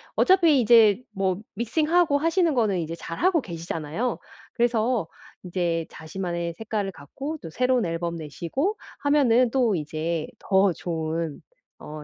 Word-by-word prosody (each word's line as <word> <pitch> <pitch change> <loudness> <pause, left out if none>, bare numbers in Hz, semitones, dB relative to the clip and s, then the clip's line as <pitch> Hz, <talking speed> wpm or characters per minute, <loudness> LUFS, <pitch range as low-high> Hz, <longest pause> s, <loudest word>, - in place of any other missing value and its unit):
어차피 335 -8 +5
이제 220 -1 +6
뭐 190 -2 0 0.2
믹싱하고 300 - +2
하시는 330 +2 +2
거는 215 -7 +1
이제 165 0 -4
잘하고 330 - 0
계시잖아요. 170 - -4 0.3
그래서 235 -4 +1 0.4
인제 170 -2 -1
자신만의 170 0 -4
색깔을 210 0 -3
갖고 275 - -6
또 165 - -7
새로운 250 +4 +1
앨범 170 0 -2
내시고 170 - -3 0.2
하면은 255 -5 +3
또 240 -6 +2
이제 155 +1 -3
더 190 0 +3
좋은 160 -2 -3 0.4
어 150 0 -8
200 Hz, 290 characters per minute, -25 LUFS, 165-255 Hz, 0.4 s, 이제